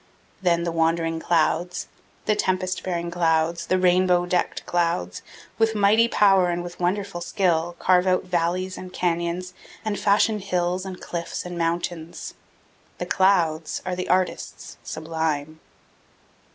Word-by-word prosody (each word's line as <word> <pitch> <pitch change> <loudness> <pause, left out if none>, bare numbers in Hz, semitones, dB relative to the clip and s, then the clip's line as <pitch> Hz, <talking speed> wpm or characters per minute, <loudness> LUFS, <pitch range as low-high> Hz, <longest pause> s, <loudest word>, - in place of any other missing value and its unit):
Then 170 -2 +2
the 170 - -1
wandering 165 0 +1
clouds, 170 +2 0 0.4
the 215 - +2
tempest 185 -2 -1
bearing 170 -2 -3
clouds, 165 -1 +1
the 185 - +2
rainbow 180 -1 +3
decked 180 0 -1
clouds, 165 - -1 0.4
with 225 0 +2
mighty 210 +3 +4
power 195 -5 +4
and 175 0 -2
with 175 0 -9
wonderful 185 0 -1
skill, 175 -2 0
carve 180 0 +3
out 185 0 +2
valleys 185 +1 -1
and 185 0 -8
canyons 175 +1 -2 0.3
and 210 -2 -1
fashion 210 +1 +3
hills 180 -1 -1
and 185 -1 -7
cliffs 170 0 -5
and 180 0 -6
mountains. 170 0 -3 0.6
The - - -3
clouds 170 -5 +1
are 185 -1 -2
the 185 - -4
artists 185 0 -1
sublime. 155 -1 -3
175 Hz, 135 wpm, -24 LUFS, 170-185 Hz, 0.6 s, mighty